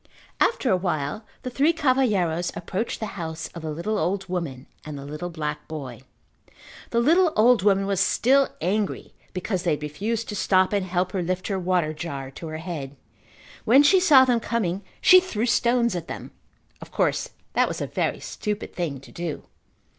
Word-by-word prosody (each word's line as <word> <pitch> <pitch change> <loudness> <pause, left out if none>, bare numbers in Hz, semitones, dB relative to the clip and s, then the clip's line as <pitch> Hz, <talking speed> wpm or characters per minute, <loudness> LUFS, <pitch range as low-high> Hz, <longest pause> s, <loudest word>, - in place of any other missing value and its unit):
After 270 - +2
a 185 - +4
while 175 +2 -2 0.2
the 255 - -4
three 285 +6 +3
cavalheiros 215 - +1
approached 190 +6 -3
the 220 - -2 0.2
house 160 0 -5
of 170 - -9
the 160 - -4
little 170 +8 -2
old 190 +4 -1
woman 165 -8 -4 0.2
and 150 -2 -7
the 140 - -8
little 150 +5 -5
black 150 -3 -4
boy. 135 -6 -7 0.9
The 235 - +1
little 330 +7 +4
old 235 0 +5
woman 195 0 +3
was 195 -2 0
still 265 +7 +3
angry 200 +4 -1 0.2
because 185 0 -2
they 175 - -1
had 150 - -10
refused 210 +10 -3
to 210 - -4
stop 190 0 +2
and 200 -2 0
help 180 0 0
her 190 - -1
lift 185 +3 -2
her 195 -2 -1
water 175 -4 +1
jar 140 -4 -6
to 165 +4 -8
her 155 0 -5
head. 160 -5 -6 0.7
When 265 +6 +6
she 375 +6 +6
saw 295 -8 +7
them 245 -2 +2
coming 200 -6 -1 0.2
she 370 - +8
threw 240 - -2
stones 235 -2 +2
at 170 -2 -4
them. - - -7 0.5
Of - - -10
course - - 0 0.2
that - - +3
was - - -4
a - - -2
very - - -1
stupid 210 -1 -4
thing 150 -7 -3
to - - -15
do. 170 -3 -5
185 Hz, 185 wpm, -24 LUFS, 160-230 Hz, 0.9 s, she